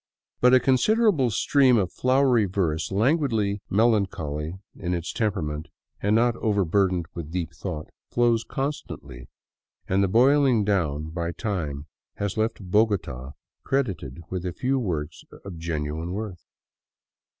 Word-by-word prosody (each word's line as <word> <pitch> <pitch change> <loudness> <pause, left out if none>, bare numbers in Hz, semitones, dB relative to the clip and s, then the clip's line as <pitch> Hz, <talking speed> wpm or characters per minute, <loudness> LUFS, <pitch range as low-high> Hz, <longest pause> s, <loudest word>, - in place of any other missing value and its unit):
But 125 +1 +6
a - - +7
con 130 0 +3
siderable 205 - +3
stream 130 +2 +4
of 95 -4 0
flowery 130 -3 +3
verse, 85 -5 -1
languidly 110 -3 +1
melancholy 95 -8 +1 0.2
in 90 -1 -2
its 85 -1 -4
tem 110 -3 +1
perament 75 -5 -4 0.4
and 105 +2 +2
not 120 +1 +3
overburdened 95 -3 +1
with 85 -3 -6
deep 85 -1 -3
thought, 85 -5 -6 0.2
flows 120 -2 +2
constantly, 70 - -5 0.6
and 95 +1 +2
the - - +3
boiling 125 +1 +4
down 80 -7 0
by 85 0 -2
time 80 -10 -3 0.3
has 100 -2 -3
left 110 -1 -1
Bogota 85 - +1 0.3
credited 90 - -2
with 90 -2 -3
a 90 -2 -3
few 130 +7 0
works 80 -9 -3 0.2
of 90 -4 -7
genuine 80 +1 -3
worth. 100 -4 -5
100 Hz, 135 wpm, -25 LUFS, 80-120 Hz, 0.6 s, a